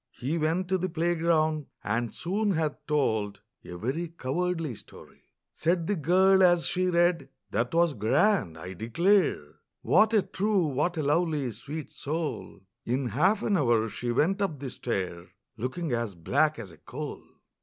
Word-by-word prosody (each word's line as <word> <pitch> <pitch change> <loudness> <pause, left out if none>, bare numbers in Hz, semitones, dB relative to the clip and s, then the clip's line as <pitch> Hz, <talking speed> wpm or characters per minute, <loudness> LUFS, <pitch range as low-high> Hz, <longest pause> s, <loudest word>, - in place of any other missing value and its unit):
He 135 +6 -2
went 165 +4 0
to 190 0 +1
the 185 +1 -1
playground, 160 -2 +1 0.2
and 115 +2 -1
soon 200 +3 -1
had 155 -2 0
told 110 -9 0 0.2
A 90 - -8
very 135 - -2
cowardly 165 0 -2
story! - - -15 0.3
Said 170 +1 0
the 205 - 0
girl 190 +4 +4
as 175 -2 +5
she 185 0 0
read, 175 -1 +2 0.2
"That 115 +4 0
was 170 -1 +3
grand, 110 - +2
I 90 +4 -7
declare! 130 - +1 0.2
What 215 +1 +4
a 205 - +4
true, 200 -2 0
what 150 +5 -1
a 155 - 0
lovely, 150 -3 +1
sweet 145 +8 -7
soul!" 150 - -4 0.2
In 125 +1 -1
half 185 - +2
an 205 - +2
hour 120 - +2
she 120 +3 -3
went 180 - +1
up 180 -7 -1
the 135 -2 -5
stair, 90 -6 -4 0.3
Looking 130 +8 -3
as 115 -5 -2
black 155 - +1
as 100 -6 -8
a - - -16
coal! - - -7
155 Hz, 160 wpm, -28 LUFS, 120-175 Hz, 0.3 s, as